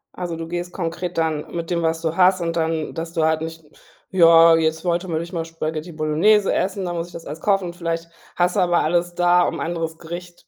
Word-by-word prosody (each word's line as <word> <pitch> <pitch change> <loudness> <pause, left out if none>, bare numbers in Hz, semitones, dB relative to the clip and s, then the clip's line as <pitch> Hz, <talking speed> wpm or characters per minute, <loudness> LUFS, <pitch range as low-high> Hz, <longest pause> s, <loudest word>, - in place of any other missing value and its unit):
Also, 175 -2 -4
du 165 0 -6
gehst 175 +1 -5
konkret 170 0 -4
dann 160 -2 -1
mit 170 0 -4
dem, 170 -1 0
was 160 0 0
du 165 -1 -2
hast 185 0 +4
und 165 0 -2
dann 160 -1 -1
dass 165 0 -5
du 160 - 0
halt 160 0 +1
nicht: 160 0 -6 0.5
„Ja, 165 -2 +7
jetzt 160 0 0
wollte 175 +1 -1
man 165 -3 -2
eigentlich 170 +3 -5
mal 165 -2 -2
Spaghetti 160 0 -5
Bolognese 165 +7 +2
essen, 190 0 -1
da 175 - -3
muss 170 0 -3
ich 175 - -17
das 165 - -9
alles 150 +3 -7
kaufen.“ 195 -2 +2
Und 170 -1 -6
vielleicht 165 -1 -3 0.3
hast 180 0 +1
du - - +2
aber 175 -2 +3
alles 175 +2 0
da, 175 0 +4
um - - -1
'n - - -6
anderes 165 -1 -3
Gericht 175 +1 -9
170 Hz, 240 wpm, -21 LUFS, 165-175 Hz, 0.5 s, Ja